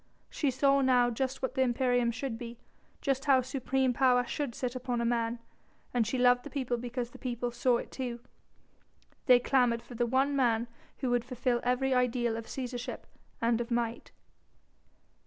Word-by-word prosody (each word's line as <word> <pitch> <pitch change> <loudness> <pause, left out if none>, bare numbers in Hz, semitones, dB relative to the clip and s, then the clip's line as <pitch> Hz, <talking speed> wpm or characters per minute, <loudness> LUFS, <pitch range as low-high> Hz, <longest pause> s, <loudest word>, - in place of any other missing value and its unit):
She 290 - 0
saw 275 +2 +3
now 250 -2 +4
just 265 +3 -3
what 260 - -1
the 265 - 0
imperium 245 -1 +2
should 240 -1 -4
be, 235 -1 -7 0.4
just 270 -1 -1
how 270 -3 +5
supreme 260 0 0
power 250 -1 +3
should 270 -2 -3
sit 250 -2 -3
upon 250 -1 -2
a 235 - 0
man. 235 0 0 0.6
And 235 -3 +2
she 255 - -1
loved 245 0 +4
the - - -8
people 255 -4 -2
because 245 0 -4
the - - -13
people 245 -2 -3
saw 240 0 +2
it - - -7
too. 245 -3 -4 1.1
They 250 -2 +8
clamoured 245 -2 +2
for - - -12
the 240 0 0
one 270 +3 +2
man 235 -3 +2 0.3
who 255 -3 0
would 245 -1 +2
fulfil 250 -1 -1
every 250 +2 +1
ideal 245 -2 +1
of 230 0 -6
Cæsarship 250 -2 -5 0.4
and 230 0 +2
of 235 - -5
might. 235 -1 -2
245 Hz, 175 wpm, -30 LUFS, 240-260 Hz, 1.1 s, They